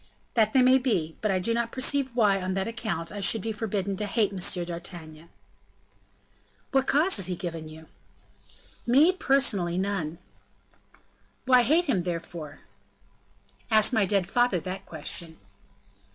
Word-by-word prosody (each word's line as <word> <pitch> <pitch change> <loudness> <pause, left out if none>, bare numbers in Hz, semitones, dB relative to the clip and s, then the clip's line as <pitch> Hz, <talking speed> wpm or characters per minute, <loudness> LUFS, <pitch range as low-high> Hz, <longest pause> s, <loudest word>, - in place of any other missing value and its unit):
"That 220 -2 +3
they 260 - +5
may 255 +1 +5
be; 180 -12 -1
but 215 - 0
I 190 - +2
do 190 +6 -1
not 235 0 -1
perceive 265 +1 -1
why, 205 -5 +3
on 185 0 -2
that 195 0 -1
account, 220 -8 -4
I 205 - -6
should 195 +2 +2
be 225 - -2
forbidden 205 -3 -2
to 210 - -2
hate 210 0 +1
M. 190 - -5 0.3
d'Artagnan." 170 -2 -9 1.4
"What 270 -1 +2
cause 315 +4 +3
has 195 - +1
he 180 - -2
given 165 -3 -6
you?" 160 +1 -12 1.0
"Me! 285 +9 +6
personally, 260 - +1
none." 185 -5 -2 1.3
"Why 255 -1 +6
hate 315 +9 +3
him, 225 - +1
therefore?" 170 -3 -6 1.1
"Ask 220 +2 +4
my 210 -4 +2
dead 195 -2 +1
father 240 -5 +2
that 185 +2 -7
question." 160 +1 -7
200 Hz, 150 wpm, -27 LUFS, 175-240 Hz, 1.4 s, Me